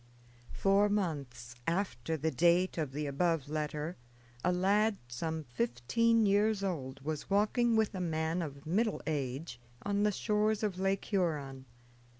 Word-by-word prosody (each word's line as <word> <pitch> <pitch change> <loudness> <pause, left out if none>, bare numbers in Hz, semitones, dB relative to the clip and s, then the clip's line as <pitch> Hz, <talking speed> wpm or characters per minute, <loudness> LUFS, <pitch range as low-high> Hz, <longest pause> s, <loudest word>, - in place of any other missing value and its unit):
Four 200 +1 +3
months 140 - -2
after 160 - -1
the 160 +2 0
date 175 +5 +3
of 150 -4 -2
the 150 +2 -3
above 150 +1 0
letter 150 +2 -3 0.5
a 180 - +3
lad 200 +4 +2
some 160 +6 -3
fifteen 120 - +1
years 205 +1 +3
old 135 -8 -3
was 155 +1 -4
walking 220 +4 +3
with 220 -1 +2
a 185 - -3
man 160 0 -1
of 140 -4 -6
middle 210 +7 0
age 140 -3 -3 0.2
on 205 0 0
the 210 0 +3
shores 215 +1 +1
of 195 -4 -1
Lake 195 0 0
Huron. 150 -9 -1
170 Hz, 145 wpm, -32 LUFS, 145-200 Hz, 0.5 s, Four